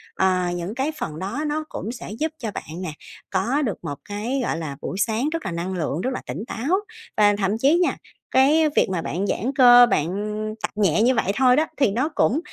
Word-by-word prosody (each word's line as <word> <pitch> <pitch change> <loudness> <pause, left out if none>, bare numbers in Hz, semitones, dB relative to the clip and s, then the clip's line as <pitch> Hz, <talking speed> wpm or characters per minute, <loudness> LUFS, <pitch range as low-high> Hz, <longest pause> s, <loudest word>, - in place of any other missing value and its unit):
ờ, 190 -1 +2 0.2
những 175 +5 -4
cái 270 +4 -1
phần 155 0 -4
đó 210 +11 -3
nó 305 +1 -1
cũng 225 - -5
sẽ 235 - -8
giúp 315 +1 0
cho 225 -4 -4
bạn 170 -1 -7
nè, 165 - -3 0.4
có 235 +10 0
được 220 -9 -1
một 145 -4 -4
cái, 220 +7 -2
gọi 165 - -1
là, 150 -4 -5
buổi 190 - -4
sáng 230 +7 +1
rất 330 0 -4
là - - -2
năng 170 +3 -3
lượng, 160 -2 -2
rất 260 +5 -1
là - - -4
tỉnh 210 - -4
táo. 305 - 0 0.4
Và 205 -1 +5
thậm 200 +1 0
chí 285 +9 +3
nha, 355 - +1 0.3
cái 300 +4 +4
việc - - +3
mà 185 -3 -1
bạn 190 +5 -2
giãn 235 +7 -1
cơ, 245 -2 +8
bạn 150 - +2 0.6
tập - - -1
nhẹ 200 -3 +2
như 250 +3 +4
vậy 200 - +1
thôi 255 0 +5
đó, 310 - +3
thì 270 -8 +3
nó 255 +8 0
cũng 300 -2 +1
225 Hz, 230 wpm, -23 LUFS, 190-270 Hz, 0.6 s, cơ